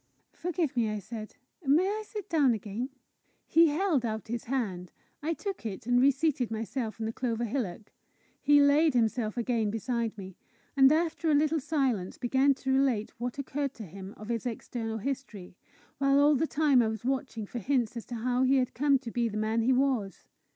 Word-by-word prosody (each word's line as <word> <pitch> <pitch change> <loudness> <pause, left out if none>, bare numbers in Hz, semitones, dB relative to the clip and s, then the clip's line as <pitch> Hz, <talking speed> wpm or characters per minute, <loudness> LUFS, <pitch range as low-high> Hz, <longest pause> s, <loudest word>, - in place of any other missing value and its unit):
"Forgive 335 -5 -2
me," 230 -3 +1
I 215 - -2
said. 215 +2 -8 0.3
"May 300 +6 +4
I 425 +2 -1
sit 420 -2 -7
down 285 -7 +3
again?" 215 +5 -5 0.6
He 330 0 +5
held 310 -3 +1
out 220 -1 -4
his 235 0 -3
hand. 205 -9 -3 0.3
I 320 +3 -1
took 395 -4 -5
it, 220 +1 -5
and 245 +1 +3
reseated 270 -2 +2
myself 225 +1 -4
on 220 - -2
the 225 - -3
clover 235 -2 -2
hillock. 220 -4 -4 0.5
He 290 0 +5
laid 285 +1 +4
himself 225 -1 +1
again 230 -3 0
beside 230 0 -2
me, 190 -2 -9 0.4
and 270 0 +7
after 325 +1 +1
a 300 - +4
little 310 +2 +2
silence 260 - -1
began 265 +3 +2
to 265 0 -1
relate 260 -6 +1
what 245 +2 -4
occurred 280 0 -3
to 220 - -8
him 190 +3 -10
of 215 +1 -10
his 235 0 -2
external 225 -1 -4
history, 225 -7 -5 0.4
while 275 0 +3
all 290 +1 +5
the 305 +3 +1
time 290 -5 +3
I 225 - +2
was 220 +1 -4
watching 260 -4 -2
for 240 - -6
hints 245 0 0
as 235 - -6
to 240 - -6
how 245 +2 0
he 260 +1 +4
had 255 -2 +1
come 280 +2 +3
to 250 -3 -8
be 235 0 0
the 215 - -5
man 220 +1 0
he 240 +3 +2
was. 255 -7 0
250 Hz, 195 wpm, -29 LUFS, 220-280 Hz, 0.6 s, and